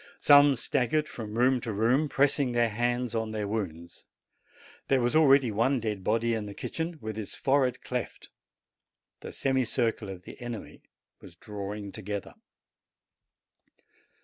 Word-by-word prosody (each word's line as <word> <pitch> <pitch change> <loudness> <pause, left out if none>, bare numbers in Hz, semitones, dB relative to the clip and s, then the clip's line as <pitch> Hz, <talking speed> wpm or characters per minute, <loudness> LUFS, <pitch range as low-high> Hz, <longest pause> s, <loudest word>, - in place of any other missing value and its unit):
Some 145 -1 +6
staggered 140 +5 0
from 110 -5 -7
room 125 +1 +3
to 115 - -4
room, 120 +9 +2
pressing 140 -2 +2
their 120 -1 +2
hands 120 +1 -1
on 110 -1 -1
their 105 -2 -3
wounds. 85 -6 -5 0.8
There 135 - +3
was 120 +3 0
already 140 -6 +5
one 125 +6 +1
dead 105 -4 -3
body 115 +3 +1
in 110 -2 -3
the 100 - -8
kitchen, 165 0 -4
with 110 0 -5
its 105 - -6
fore 135 0 +2
head 125 - -3
cleft. - - -5 0.9
The - - -8
semicircle 120 -5 0
of 95 -2 -8
the - - -12
enemy 120 -3 -7 0.4
was 85 - -14
drawing 100 +1 -6
together. 105 -1 -6
115 Hz, 145 wpm, -28 LUFS, 105-130 Hz, 0.9 s, Some